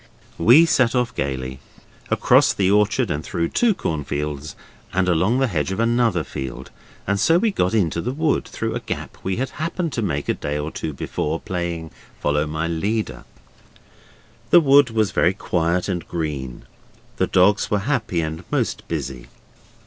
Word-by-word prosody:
We 125 Hz, -, +7 dB
set 130 Hz, -7 st, +2 dB
off 125 Hz, -2 st, +1 dB
gaily. 65 Hz, -1 st, -3 dB, 0.5 s
Across -, -, +4 dB
the 95 Hz, -1 st, +1 dB
orchard 105 Hz, +2 st, +2 dB
and 75 Hz, +1 st, -2 dB
through 85 Hz, 0 st, -2 dB
two 235 Hz, -4 st, +2 dB
cornfields, 75 Hz, -, -3 dB, 0.4 s
and 95 Hz, 0 st, +1 dB
along 90 Hz, +7 st, +2 dB
the 135 Hz, -, +3 dB
hedge 85 Hz, -, -1 dB
of 95 Hz, -, -3 dB
another 115 Hz, -6 st, +2 dB
field, 65 Hz, -4 st, -7 dB, 0.3 s
and 100 Hz, 0 st, 0 dB
so 165 Hz, +10 st, +4 dB
we 220 Hz, +4 st, +2 dB
got 95 Hz, -, 0 dB
into 85 Hz, -5 st, +1 dB
the 125 Hz, -, -2 dB
wood, 155 Hz, +2 st, 0 dB
through -, -, -3 dB
a -, -, -2 dB
gap -, -, -6 dB
we 95 Hz, 0 st, -2 dB
had 130 Hz, +2 st, -2 dB
happened 165 Hz, -1 st, -2 dB
to 115 Hz, -, -1 dB
make 70 Hz, -9 st, -2 dB
a -, -, +2 dB
day 75 Hz, 0 st, -3 dB
or 75 Hz, +2 st, -3 dB
two 80 Hz, -, -4 dB
before, 75 Hz, +3 st, -3 dB
playing 85 Hz, -3 st, -4 dB, 0.3 s
'follow 75 Hz, +1 st, +1 dB
my 80 Hz, +2 st, -2 dB
leader'. 100 Hz, +7 st, -2 dB, 1.2 s
The 175 Hz, -, +8 dB
wood 140 Hz, -3 st, +5 dB
was 110 Hz, -4 st, +1 dB
very 90 Hz, +3 st, +2 dB
quiet 90 Hz, -2 st, 0 dB
and 90 Hz, -3 st, -3 dB
green; 75 Hz, -7 st, -4 dB, 0.5 s
the -, -, +1 dB
dogs 100 Hz, +3 st, +3 dB
were 105 Hz, -, +2 dB
happy 115 Hz, -, 0 dB
and 80 Hz, 0 st, -4 dB
most -, -, -1 dB
busy. 65 Hz, -2 st, -4 dB
90 Hz, 170 wpm, -22 LUFS, 80-115 Hz, 1.2 s, The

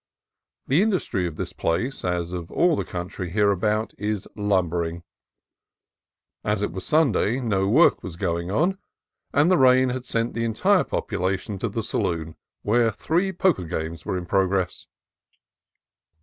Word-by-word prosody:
The 145 Hz, +7 st, +3 dB
industry 160 Hz, -, 0 dB
of 80 Hz, -, -6 dB
this -, -, -5 dB
place, 95 Hz, +12 st, -1 dB
as 90 Hz, -1 st, -2 dB
of 85 Hz, -2 st, -5 dB
all 175 Hz, -2 st, +3 dB
the -, -, -1 dB
country 90 Hz, 0 st, -5 dB
hereabout, 105 Hz, +3 st, +1 dB
is 105 Hz, -1 st, -2 dB
lumbering. 85 Hz, -5 st, 0 dB, 1.4 s
As 105 Hz, -1 st, 0 dB
it 105 Hz, -, -1 dB
was 95 Hz, +2 st, -6 dB
Sunday, 135 Hz, -6 st, +2 dB
no 100 Hz, -6 st, 0 dB
work 140 Hz, +12 st, +5 dB
was 90 Hz, -3 st, -7 dB
going 85 Hz, -1 st, -2 dB
on, 175 Hz, -, +1 dB, 0.5 s
and 150 Hz, +5 st, +3 dB
the 185 Hz, -, +4 dB
rain 130 Hz, 0 st, +5 dB
had 125 Hz, 0 st, -4 dB
sent 115 Hz, -1 st, -1 dB
the 115 Hz, -, -2 dB
entire 175 Hz, -, +3 dB
popu -, -, -3 dB
lation 95 Hz, +2 st, -2 dB
to 115 Hz, -, -1 dB
the 110 Hz, +2 st, -3 dB
saloon, 85 Hz, -8 st, -2 dB, 0.3 s
where 115 Hz, +2 st, +3 dB
three 170 Hz, -, 0 dB
poker 180 Hz, -, +1 dB
games 80 Hz, 0 st, -4 dB
were 100 Hz, -3 st, -2 dB
in 90 Hz, -, -5 dB
progress. 95 Hz, -1 st, 0 dB
105 Hz, 150 wpm, -24 LUFS, 90-125 Hz, 1.4 s, work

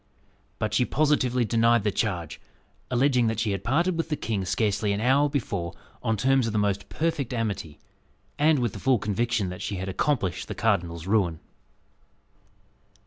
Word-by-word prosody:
But 110 Hz, -, -2 dB
she 125 Hz, -, +3 dB
positively 130 Hz, -4 st, +2 dB
denied 115 Hz, 0 st, +3 dB
the 105 Hz, -, +1 dB
charge, 90 Hz, -7 st, -2 dB, 0.5 s
alleging 125 Hz, -1 st, +3 dB
that 110 Hz, 0 st, -1 dB
she 110 Hz, -3 st, 0 dB
had 100 Hz, -1 st, -3 dB
parted 165 Hz, -, +1 dB
with 165 Hz, 0 st, -2 dB
the 150 Hz, -, 0 dB
king 105 Hz, -8 st, -2 dB
scarcely 100 Hz, +2 st, 0 dB
an 100 Hz, -, -2 dB
hour 135 Hz, +5 st, +3 dB
before 100 Hz, -, -3 dB, 0.3 s
on 110 Hz, -1 st, 0 dB
terms 130 Hz, +2 st, +2 dB
of 110 Hz, -, -3 dB
the -, -, 0 dB
most 100 Hz, -1 st, 0 dB
perfect 155 Hz, -6 st, -1 dB
amity, 100 Hz, -9 st, -3 dB, 0.6 s
and 155 Hz, +1 st, +4 dB
with 120 Hz, -5 st, -1 dB
the -, -, -7 dB
full 130 Hz, -2 st, +3 dB
conviction 105 Hz, 0 st, -1 dB
that 90 Hz, -, -7 dB
she 100 Hz, -, -3 dB
had 95 Hz, +1 st, -4 dB
accomplished 100 Hz, -3 st, -1 dB
the -, -, -5 dB
cardinal's 85 Hz, -1 st, 0 dB
ruin. 95 Hz, -6 st, +1 dB
115 Hz, 170 wpm, -26 LUFS, 100-130 Hz, 0.6 s, and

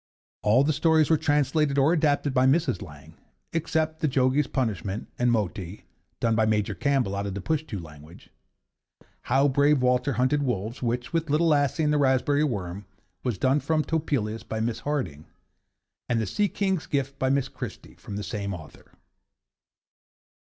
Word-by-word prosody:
All 115 Hz, +6 st, +4 dB
the 155 Hz, +2 st, +1 dB
stories 160 Hz, +1 st, +3 dB
were -, -, +7 dB
translated 145 Hz, 0 st, +1 dB
or 140 Hz, +4 st, +4 dB
adapted 145 Hz, -4 st, +1 dB
by 130 Hz, 0 st, +4 dB
Mrs. 140 Hz, -3 st, +2 dB
Lang, 75 Hz, -7 st, -11 dB, 0.4 s
except 160 Hz, -1 st, -1 dB
'The 155 Hz, -, +1 dB
Jogi's 130 Hz, +1 st, +2 dB
Punishment' 105 Hz, -5 st, -2 dB
and 120 Hz, 0 st, +3 dB
'Moti,' 100 Hz, -3 st, -3 dB, 0.3 s
done 115 Hz, -1 st, +1 dB
by 110 Hz, 0 st, +2 dB
Major 105 Hz, -1 st, +1 dB
Campbell 130 Hz, -3 st, 0 dB
out 100 Hz, 0 st, -2 dB
of 95 Hz, -, -4 dB
the -, -, -3 dB
Pushtoo 140 Hz, -, -2 dB
language; 75 Hz, 0 st, -13 dB, 0.9 s
'How 135 Hz, +3 st, +3 dB
Brave 140 Hz, 0 st, +3 dB
Walter 125 Hz, +2 st, +2 dB
hunted 130 Hz, +4 st, +1 dB
Wolves,' 115 Hz, -3 st, -2 dB
which, 120 Hz, +2 st, -2 dB
with 165 Hz, -2 st, 0 dB
'Little 160 Hz, +3 st, +3 dB
Lasse' 145 Hz, -1 st, +2 dB
and 150 Hz, -1 st, +2 dB
'The 150 Hz, -, +2 dB
Raspberry 140 Hz, +2 st, +2 dB
Worm,' 100 Hz, -7 st, -3 dB, 0.4 s
was 120 Hz, -6 st, -1 dB
done 130 Hz, +8 st, +2 dB
from 155 Hz, 0 st, 0 dB
Topelius 130 Hz, -10 st, -1 dB
by 110 Hz, 0 st, -5 dB
Miss 115 Hz, +1 st, -1 dB
Harding; 95 Hz, -, -3 dB, 0.8 s
and 120 Hz, -, +1 dB
'The 110 Hz, -, 0 dB
Sea 205 Hz, -, +1 dB
King's 190 Hz, -4 st, -1 dB
Gift,' 140 Hz, -1 st, -2 dB
by 130 Hz, -, +1 dB
Miss 135 Hz, -1 st, +1 dB
Christie, -, -, -8 dB
from 100 Hz, -, -9 dB
the 105 Hz, -, -4 dB
same 100 Hz, -1 st, -4 dB
author. 75 Hz, -4 st, -14 dB
130 Hz, 165 wpm, -26 LUFS, 105-150 Hz, 0.9 s, were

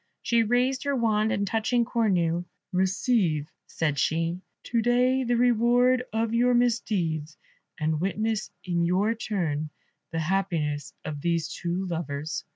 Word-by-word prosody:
She 235 Hz, -1 st, +3 dB
raised 245 Hz, +4 st, +1 dB
her 280 Hz, -1 st, +1 dB
wand, 220 Hz, -3 st, +2 dB
and 200 Hz, -, 0 dB
touching 225 Hz, +3 st, +1 dB
Cornue, 180 Hz, -8 st, +1 dB, 0.3 s
"Receive," 185 Hz, -, +1 dB, 0.2 s
said 150 Hz, -4 st, -1 dB
she, 165 Hz, +4 st, 0 dB, 0.2 s
"to 235 Hz, -1 st, 0 dB
day, 250 Hz, +3 st, +3 dB
the 240 Hz, -1 st, +1 dB
reward 245 Hz, +1 st, +3 dB
of 225 Hz, +1 st, -1 dB
your 245 Hz, +1 st, +3 dB
misdeeds, 180 Hz, -10 st, 0 dB, 0.4 s
and 155 Hz, 0 st, 0 dB
witness 215 Hz, +3 st, -1 dB
in 175 Hz, -2 st, 0 dB
your 190 Hz, +6 st, +2 dB
turn 165 Hz, -9 st, -2 dB, 0.4 s
the 165 Hz, -, -3 dB
happiness 160 Hz, -4 st, -1 dB
of 145 Hz, -2 st, -5 dB
these 170 Hz, -1 st, -1 dB
two 175 Hz, +2 st, -2 dB
lovers." 155 Hz, -3 st, -4 dB
195 Hz, 135 wpm, -26 LUFS, 165-235 Hz, 0.4 s, She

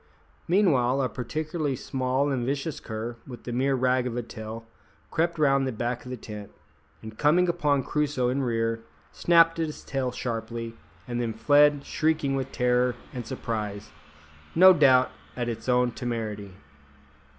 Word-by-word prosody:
Meanwhile 140 Hz, -9 st, +3 dB
a 130 Hz, -, 0 dB
particularly 150 Hz, +3 st, -3 dB
small 130 Hz, +2 st, -1 dB
and 130 Hz, -3 st, -1 dB
vicious 140 Hz, +4 st, -2 dB
cur, 115 Hz, +2 st, -5 dB
with 125 Hz, -2 st, -10 dB
a -, -, -2 dB
mere 135 Hz, +3 st, +1 dB
rag 130 Hz, 0 st, +2 dB
of 120 Hz, -1 st, -4 dB
a 120 Hz, -, -2 dB
tail, 110 Hz, 0 st, -8 dB, 0.5 s
crept 170 Hz, +1 st, 0 dB
round 140 Hz, -3 st, +3 dB
by -, -, 0 dB
the 115 Hz, -, -7 dB
back 120 Hz, +1 st, -2 dB
of -, -, -8 dB
the 125 Hz, -, -5 dB
tent, 105 Hz, -2 st, -8 dB, 0.5 s
and 110 Hz, 0 st, -10 dB
coming 170 Hz, +5 st, +4 dB
upon 150 Hz, -6 st, +1 dB
Crusoe 145 Hz, -4 st, 0 dB
in 135 Hz, +2 st, 0 dB
rear, 115 Hz, -2 st, -1 dB, 0.3 s
snapped 165 Hz, -1 st, +4 dB
at 165 Hz, -, +1 dB
his 150 Hz, -, -8 dB
tail 130 Hz, -2 st, -2 dB
sharply, 115 Hz, -1 st, -4 dB, 0.3 s
and 120 Hz, 0 st, -2 dB
then 115 Hz, -2 st, -2 dB
fled 145 Hz, +4 st, +4 dB
shrieking 155 Hz, -3 st, 0 dB
with 135 Hz, 0 st, -3 dB
terror 125 Hz, 0 st, +2 dB, 0.2 s
and 120 Hz, -3 st, -6 dB
surprise, 105 Hz, -3 st, -4 dB, 0.6 s
no 185 Hz, +3 st, +9 dB
doubt, 130 Hz, -5 st, +5 dB, 0.3 s
at 120 Hz, -1 st, -1 dB
its 120 Hz, +2 st, -4 dB
own 125 Hz, 0 st, +3 dB
temerity. 110 Hz, -6 st, -4 dB
125 Hz, 160 wpm, -26 LUFS, 115-145 Hz, 0.6 s, no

